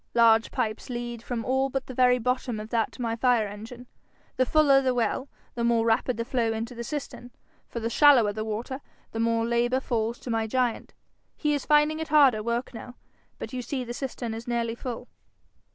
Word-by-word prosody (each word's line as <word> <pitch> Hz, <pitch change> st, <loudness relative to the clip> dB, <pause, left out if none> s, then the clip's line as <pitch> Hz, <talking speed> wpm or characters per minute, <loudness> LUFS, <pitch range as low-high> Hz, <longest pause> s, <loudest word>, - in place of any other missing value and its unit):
Large 225 Hz, -1 st, +5 dB
pipes 215 Hz, +2 st, -3 dB
lead 240 Hz, -1 st, -5 dB
from 235 Hz, -1 st, -4 dB
all 265 Hz, +1 st, +1 dB
but 270 Hz, 0 st, -3 dB
the 260 Hz, -, -8 dB
very 250 Hz, 0 st, +4 dB
bottom 250 Hz, -1 st, -1 dB
of 215 Hz, +1 st, -8 dB
that 230 Hz, -2 st, +1 dB
to 250 Hz, -, -6 dB
my 230 Hz, -1 st, -1 dB
fire 240 Hz, -2 st, +2 dB
engine. 225 Hz, +5 st, -9 dB, 0.5 s
The 255 Hz, -, +1 dB
fuller 285 Hz, -2 st, +5 dB
the 255 Hz, -2 st, 0 dB
well, 245 Hz, +3 st, -1 dB, 0.2 s
the 235 Hz, -, -3 dB
more 235 Hz, -1 st, +2 dB
rapid 230 Hz, +2 st, +1 dB
the 230 Hz, -, -2 dB
flow 235 Hz, -3 st, 0 dB
into 225 Hz, +2 st, -4 dB
the 235 Hz, 0 st, -6 dB
cistern, 275 Hz, -3 st, -6 dB, 0.4 s
for 235 Hz, -, -4 dB
the 230 Hz, -, -2 dB
shallower 240 Hz, -5 st, +5 dB
the 215 Hz, +1 st, -3 dB
water, 230 Hz, +5 st, -4 dB, 0.3 s
the 225 Hz, -, -5 dB
more 230 Hz, 0 st, +1 dB
labour 240 Hz, +2 st, +1 dB
falls 235 Hz, -2 st, -2 dB
to 245 Hz, -, -5 dB
my 225 Hz, -1 st, 0 dB
giant. 245 Hz, 0 st, -1 dB, 0.4 s
He 300 Hz, -1 st, +1 dB
is 285 Hz, -, -3 dB
finding 300 Hz, +1 st, +4 dB
it 320 Hz, -, -3 dB
harder 280 Hz, -8 st, +5 dB
work 235 Hz, +3 st, -2 dB
now. 245 Hz, +2 st, -9 dB, 0.4 s
But -, -, -7 dB
you 255 Hz, -, -3 dB
see 255 Hz, +2 st, -3 dB
the 240 Hz, 0 st, -6 dB
cistern 245 Hz, -3 st, -4 dB
is 225 Hz, +2 st, -7 dB
nearly 235 Hz, -1 st, -1 dB
full.' 245 Hz, 0 st, -6 dB
240 Hz, 205 wpm, -26 LUFS, 230-255 Hz, 0.5 s, Large